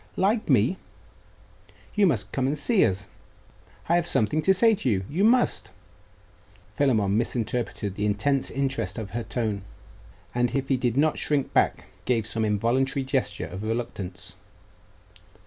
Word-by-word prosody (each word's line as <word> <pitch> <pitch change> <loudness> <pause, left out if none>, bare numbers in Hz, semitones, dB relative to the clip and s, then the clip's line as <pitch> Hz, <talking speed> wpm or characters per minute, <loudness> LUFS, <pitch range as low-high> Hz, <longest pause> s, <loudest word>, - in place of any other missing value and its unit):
'Like 210 +4 +1
me! - - +3 1.2
you 205 -2 +4
must 170 - -1
come 130 -1 0
and 145 +2 -1
see 195 +8 +3
us. 95 +1 0 0.8
I 170 - +3
have 175 0 +1
something 145 +8 +2
to 190 - +3
say 225 +4 +5
to 165 -10 -1
you.... 95 -4 0
You 175 +7 -1
must!' 245 +3 +3 1.1
Philammon 110 -9 +2
misinterpreted 115 -3 -1
the 105 +2 -1
intense 130 +7 +1
interest 135 -2 -2
of 110 -3 -5
her 120 - -3
tone, 110 -4 -2 0.7
and 120 +1 0
if 135 0 -1
he 135 - +3
did 125 -1 -1
not 155 +2 +2
shrink 145 -3 -1
back, - - +2 0.2
gave 115 -4 +1
some 110 0 -1
involuntary 125 +6 +1
gesture 130 - -1
of 90 +4 -7
reluctance. 100 -5 -5
125 Hz, 145 wpm, -26 LUFS, 105-145 Hz, 1.2 s, say